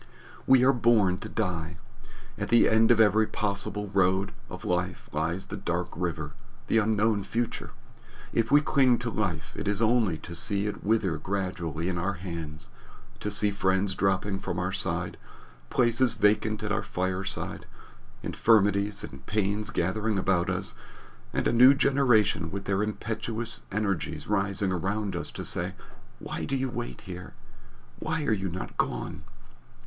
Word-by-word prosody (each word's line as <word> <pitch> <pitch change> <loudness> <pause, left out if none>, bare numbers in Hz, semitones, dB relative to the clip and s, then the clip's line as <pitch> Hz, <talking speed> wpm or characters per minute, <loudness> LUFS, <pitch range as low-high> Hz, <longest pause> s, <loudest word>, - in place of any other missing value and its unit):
We 130 -1 +6
are 135 +1 +6
born 110 -7 +3
to 110 - -7
die. 85 -6 -2 0.6
At - - -4
the 120 0 +6
end 110 0 +4
of 120 -2 +5
every 110 0 +5
possible 105 0 -2
road 95 -1 +2 0.2
of - - -8
life 90 0 -1
lies 80 +5 -1
the - - -6
dark 85 +1 -2
River 80 -4 -3 0.3
the 115 - +3
unknown 110 -1 +2
future. 120 +3 -3 0.6
If 115 0 +1
we 145 +2 +6
cling 135 -5 +4
to 120 0 -3
life, 100 -6 -2
it - - -4
is 100 0 +1
only 115 -6 +3
to 85 +2 -9
see 100 +3 -1
it 105 - -4
wither 100 -6 +1
gradually 90 -3 -3
in 90 -2 -1
our 100 +4 0
hands, 80 -6 -6 0.5
to 105 - -2
see 105 0 +2
friends 95 0 +1
dropping 95 +1 0
from 90 - -4
our 90 +1 -1
side, 95 - -1 0.5
places 120 0 +3
vacant 110 0 +2
at 105 - -2
our 105 +1 +1
fireside, 95 -1 -3 0.6
infirmities 105 -2 +2
and 65 -2 -9
pains 105 0 0
gathering 105 +4 0
about 95 -2 +1
us, - - -2 0.6
and - - 0
a - - +1
new 125 +4 +8
generation 125 -11 +3
with 100 +3 -5
their 100 0 +1
impetuous 110 +2 -1
energies 95 -7 -2
rising 100 -1 0
around 100 +3 -1
us - - -3
to - - -6
say, - - -1 0.4
Why - - -5
do 135 - -1
you 130 -1 -1
wait 60 - -5
here? 90 0 -8 0.7
Why 155 0 -2
are 110 - +2
you 95 -2 -1
not 90 +2 -6
gone? - - -2
100 Hz, 155 wpm, -28 LUFS, 90-110 Hz, 0.7 s, new